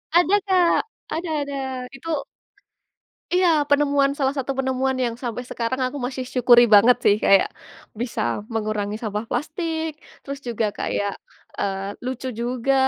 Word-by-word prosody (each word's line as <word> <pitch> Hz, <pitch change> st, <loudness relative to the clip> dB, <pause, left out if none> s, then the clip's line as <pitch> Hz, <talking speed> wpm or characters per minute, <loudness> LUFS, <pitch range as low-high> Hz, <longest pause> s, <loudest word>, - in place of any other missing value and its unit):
Ada, 355 Hz, +3 st, +5 dB
Kak! 365 Hz, -3 st, +4 dB, 0.4 s
Ada 330 Hz, +1 st, -3 dB
ada. 280 Hz, 0 st, -4 dB, 0.4 s
Itu 330 Hz, +5 st, -9 dB, 1.2 s
iya, 365 Hz, 0 st, +4 dB, 0.2 s
penemuan 285 Hz, -1 st, +3 dB
salah 270 Hz, -1 st, +1 dB
satu 270 Hz, +1 st, -1 dB
penemuan, 265 Hz, 0 st, 0 dB
yang 235 Hz, -1 st, -1 dB
sampai 240 Hz, 0 st, -3 dB
sekarang 245 Hz, +3 st, -2 dB
aku 285 Hz, +3 st, -4 dB
masih 255 Hz, 0 st, -4 dB
syukuri 245 Hz, -1 st, +6 dB
banget, 245 Hz, +5 st, +7 dB
sih. 205 Hz, -, +6 dB
Kayak, 195 Hz, -1 st, +5 dB, 0.5 s
bisa 240 Hz, -, -2 dB, 0.3 s
mengurangi 210 Hz, -1 st, -2 dB
sampah 210 Hz, 0 st, -3 dB
plastik, 320 Hz, +4 st, -2 dB, 0.3 s
terus 280 Hz, 0 st, -6 dB
juga 230 Hz, -2 st, 0 dB
kayak, 205 Hz, 0 st, -1 dB, 0.5 s
eee, 195 Hz, 0 st, -3 dB
lucu 260 Hz, 0 st, -4 dB
juga, 250 Hz, +2 st, 0 dB
260 Hz, 135 wpm, -23 LUFS, 230-285 Hz, 1.2 s, banget